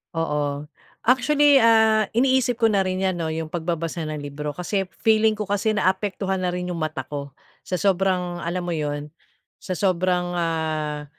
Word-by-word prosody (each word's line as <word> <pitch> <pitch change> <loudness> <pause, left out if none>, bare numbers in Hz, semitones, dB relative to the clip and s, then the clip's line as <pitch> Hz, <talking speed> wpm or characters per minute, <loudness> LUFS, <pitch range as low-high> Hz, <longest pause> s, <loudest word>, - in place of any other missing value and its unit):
Oo. 150 -2 -2 0.3
Actually, 285 +3 +4
ah, 220 -2 +5
iniisip 250 0 +2
ko 225 - +6
na 200 -2 +2
rin 185 0 -2
yan 190 -2 0
'no, 160 -2 -2
yung 160 0 -4
pagbabasa 165 -1 -3
ng 155 -1 -4
libro 145 +1 -5
kasi 190 +3 -2 0.2
feeling 220 0 +4
ko 210 -1 -5
kasi 205 +2 +1
naapektuhan 190 -1 0
na 180 -1 0
rin 180 0 -3
yung 175 - -3
mata 155 -4 -2
ko, 140 -2 -6 0.3
sa - - -7
sobrang 185 -2 +1
alam 175 +2 -2
mo 175 - -4
yun 145 -1 -3 0.5
sa 185 - -4
sobrang 180 -1 +1
ah, 155 -3 -2
180 Hz, 165 wpm, -23 LUFS, 155-210 Hz, 0.5 s, ko